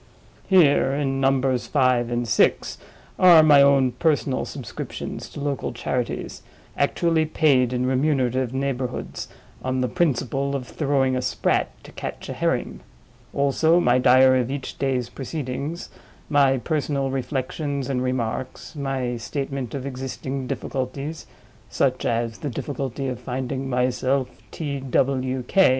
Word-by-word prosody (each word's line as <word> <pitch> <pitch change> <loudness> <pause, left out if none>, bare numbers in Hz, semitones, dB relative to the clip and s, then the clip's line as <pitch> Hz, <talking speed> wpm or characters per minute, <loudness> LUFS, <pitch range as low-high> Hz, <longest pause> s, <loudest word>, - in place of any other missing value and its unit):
Here, 145 -7 +4
in 135 -1 -1
Numbers 135 -2 +1
Five 130 -4 +2
and 120 0 -1
Six, - - +2 0.4
are 175 -4 +8
my 145 -2 +7
own 140 -2 +5
personal 145 -3 0
subscriptions 130 -5 -6
to - - -9
local 140 -3 -2
charities, - - -3 0.3
actually 165 -2 +1
paid 135 -6 +3
in 125 0 0
remunerative 130 -2 +1
neighborhoods, 130 -2 -3 0.4
on 130 0 -1
the 125 - +1
principle 140 0 0
of 130 -3 -4
throwing 135 -3 +1
a 130 - 0
sprat 125 - 0
to - - -12
catch - - -7
a - - -3
herring; - - -1 0.5
also, 160 +5 +3
my 125 -6 +3
diary 130 0 +6
of 125 - -4
each 135 -1 -5
day's 130 -3 0
proceedings, 140 +4 -5 0.4
my 140 -2 +4
personal 140 -1 -1
reflections 135 +1 -3
and 130 -2 -1
remarks, 125 +2 -3
my 135 -4 -2
statement 135 0 -4
of 135 -1 -5
existing 130 0 -5
difficulties 135 +5 -4 0.4
(such - - 0
as 115 -1 -1
the 150 - -3
difficulty 135 0 -4
of 125 -3 -4
finding 130 +1 -4
myself 130 +1 0 0.2
T. 145 -4 -4
W. 130 0 0
K. 190 +8 +4
135 Hz, 135 wpm, -23 LUFS, 125-140 Hz, 0.5 s, are